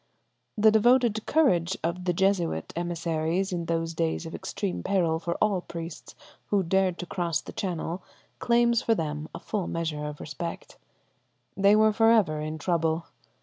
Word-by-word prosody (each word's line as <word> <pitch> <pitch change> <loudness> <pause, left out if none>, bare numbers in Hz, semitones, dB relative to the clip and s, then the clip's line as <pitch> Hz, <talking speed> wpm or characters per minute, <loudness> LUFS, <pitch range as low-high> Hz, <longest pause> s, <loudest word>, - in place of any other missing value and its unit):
The 215 +1 +6
devoted 230 0 +3
courage 190 - +2
of 175 +2 -2
the 180 - +2
Jesuit 175 - 0
emissaries 170 +2 -1
in 170 -1 -2
those 165 0 -1
days 80 - -1
of - - -7
extreme 90 -1 -4
peril 165 - +1
for 170 0 -3
all 205 -4 +1
priests 165 -2 -8 0.3
who 200 -2 +2
dared 185 0 +1
to 180 - -5
cross 170 -3 -1
the - - -10
channel 180 -1 -3 0.4
claims 235 0 +3
for 230 -3 +2
them 150 -3 -3
a - - -5
full 200 -5 -3
measure 160 -3 -3
of 150 0 -6
respect. 165 +3 -6 0.8
They 200 +2 +5
were 215 0 +4
for 225 +1 +4
ever 185 -10 +3
in 155 +1 -4
trouble. 165 0 0
175 Hz, 160 wpm, -27 LUFS, 165-200 Hz, 0.8 s, The